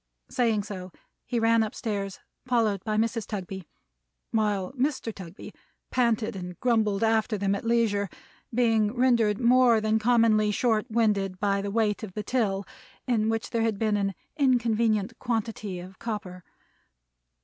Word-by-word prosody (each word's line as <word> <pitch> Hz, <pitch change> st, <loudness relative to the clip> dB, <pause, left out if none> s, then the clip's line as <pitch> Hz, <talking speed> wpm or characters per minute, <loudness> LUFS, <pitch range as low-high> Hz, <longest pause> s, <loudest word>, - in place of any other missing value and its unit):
Saying 225 Hz, -5 st, +1 dB
so, 185 Hz, -3 st, -7 dB, 0.4 s
he 240 Hz, -, 0 dB
ran 230 Hz, 0 st, +4 dB
up 215 Hz, -1 st, -2 dB
stairs, 200 Hz, -4 st, -3 dB, 0.3 s
followed 220 Hz, -6 st, +1 dB
by 215 Hz, -1 st, -1 dB
Mrs. 225 Hz, -1 st, 0 dB
Tugby; 190 Hz, -3 st, -6 dB, 0.6 s
while 210 Hz, -4 st, 0 dB
Mr. 260 Hz, -3 st, -1 dB
Tugby 185 Hz, -2 st, -10 dB, 0.4 s
panted 235 Hz, -4 st, +1 dB
and 180 Hz, -1 st, -7 dB
grumbled 220 Hz, -4 st, +1 dB
after 220 Hz, -1 st, +2 dB
them 200 Hz, 0 st, 0 dB
at 200 Hz, -, -3 dB
leisure: 225 Hz, -4 st, +1 dB, 0.4 s
being 225 Hz, -2 st, +2 dB
rendered 235 Hz, -5 st, +3 dB
more 245 Hz, -1 st, +5 dB
than 215 Hz, 0 st, +1 dB
commonly 220 Hz, -2 st, +3 dB
short 220 Hz, +2 st, +1 dB
winded 205 Hz, -5 st, +1 dB
by 200 Hz, -1 st, +1 dB
the 200 Hz, -, -3 dB
weight 210 Hz, -1 st, +1 dB
of 210 Hz, -4 st, -7 dB
the 210 Hz, -, -4 dB
till, 200 Hz, -6 st, 0 dB, 0.4 s
in 225 Hz, -4 st, +1 dB
which 225 Hz, 0 st, -2 dB
there 230 Hz, -, 0 dB
had 225 Hz, -2 st, 0 dB
been 215 Hz, 0 st, +1 dB
an 195 Hz, -2 st, -1 dB, 0.2 s
inconvenient 230 Hz, -5 st, +1 dB
quantity 220 Hz, -5 st, -3 dB
of 185 Hz, +2 st, -11 dB
copper. 205 Hz, -6 st, -5 dB
215 Hz, 150 wpm, -27 LUFS, 200-230 Hz, 0.6 s, more